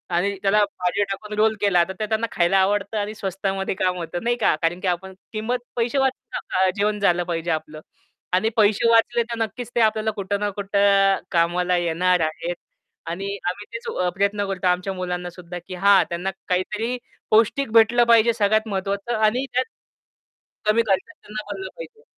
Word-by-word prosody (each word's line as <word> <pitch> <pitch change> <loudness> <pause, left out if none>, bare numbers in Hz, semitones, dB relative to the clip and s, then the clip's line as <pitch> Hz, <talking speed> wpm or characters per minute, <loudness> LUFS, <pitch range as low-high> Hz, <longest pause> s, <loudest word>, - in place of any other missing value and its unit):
आणि 195 +4 +1
त्याला 205 +1 +3
भाजी 200 0 -1
टाकून 210 +2 -6
रोल 220 +1 +3
केला, 190 -4 +4
तर - - -3
ते 215 - 0
त्यांना 220 +1 0
खायला 175 +2 +2
आवडतं 200 +2 +1
आणि 210 +1 -2
स्वस्तामध्ये 195 0 -2
काम 185 -1 0
होतं, 175 +2 -5
नाही 240 +1 +1
का. - - +4
कारण 170 +2 0
की 190 - -3
आपण 185 +2 -2 0.2
किंमत 220 +4 -1 0.2
पैसे 240 +3 0
वाचून 265 -1 -1
नका, 185 0 +1
जेवण 210 +1 +1
झालं 175 -3 +2
पाहिजे 170 -1 -2
आपलं 155 -1 -4 0.5
आणि 220 +5 +3
पैसे 215 +2 +4
वाचले 230 +1 +4
तर 235 0 -6
नक्कीच 230 +2 -4
ते 240 - +3
आपल्याला 220 0 +2
कुठं 200 -1 -3
ना 205 0 0
कुठं 200 -1 +3
कामाला 175 +1 +2
येणार 175 +1 +2
आहेत 160 +2 -2 0.5
आणि 195 +4 -4
आम्ही 205 +3 -6
तेच 230 - -6
अ, 180 0 +1
प्रयत्न 200 +1 +1
करतो 190 -1 -2
आमच्या 180 +2 0
मुलांनासुद्धा 180 -1 -5
की 185 - -6
हा 200 -2 +7
त्यांना 175 +3 -2 0.2
काहीतरी 210 +7 -1 0.3
पौष्टिक 230 +3 +3
भेटलं 230 +1 +6
पाहिजे 230 0 +6
सगळ्यात 215 0 +2
महत्त्वाचं 200 +3 -2
आणि 220 +5 +2
त्यात 255 +1 +2 1.0
कमी 215 +2 +4
खर्चात 195 +10 0
त्यांना 215 0 -6
बनलं 380 - -5
पाहिजे. 485 -2 -11
200 Hz, 175 wpm, -23 LUFS, 180-220 Hz, 1.0 s, हा